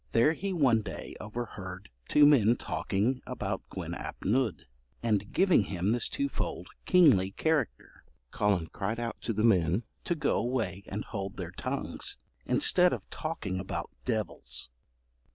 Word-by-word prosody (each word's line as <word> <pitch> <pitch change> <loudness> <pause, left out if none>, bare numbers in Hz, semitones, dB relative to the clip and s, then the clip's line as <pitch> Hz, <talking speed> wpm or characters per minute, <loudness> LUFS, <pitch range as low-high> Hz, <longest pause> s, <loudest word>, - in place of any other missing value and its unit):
There 120 +7 +5
he 195 +4 -3
one 135 -11 +3
day - - -7
overheard 100 - -6 0.2
two 150 - +6
men 120 -6 +6
talking 120 +4 -1
about - - -3
Gwyn - - -5
ap - - -7
Nudd, 110 - +1 0.4
and 105 -3 0
giving 185 - +4
him 95 +1 -1
this 120 +1 +1
twofold 280 0 -3 0.2
kingly 140 - +5
character. 150 - -1 0.3
Collen 100 -5 +2
cried 110 +4 -2
out 120 -1 -4
to - - -2
the 110 0 0
men 95 -2 +3 0.2
to 175 - 0
go 155 - +1
away 110 -7 -1
and 105 +2 -4
hold 100 -2 -5
their 85 -2 -5
tongues, - - -3 0.3
instead 180 0 +5
of - - -5
talking 110 - -3
about 95 -2 -4
devils. 110 - -1
110 Hz, 145 wpm, -30 LUFS, 95-130 Hz, 0.4 s, two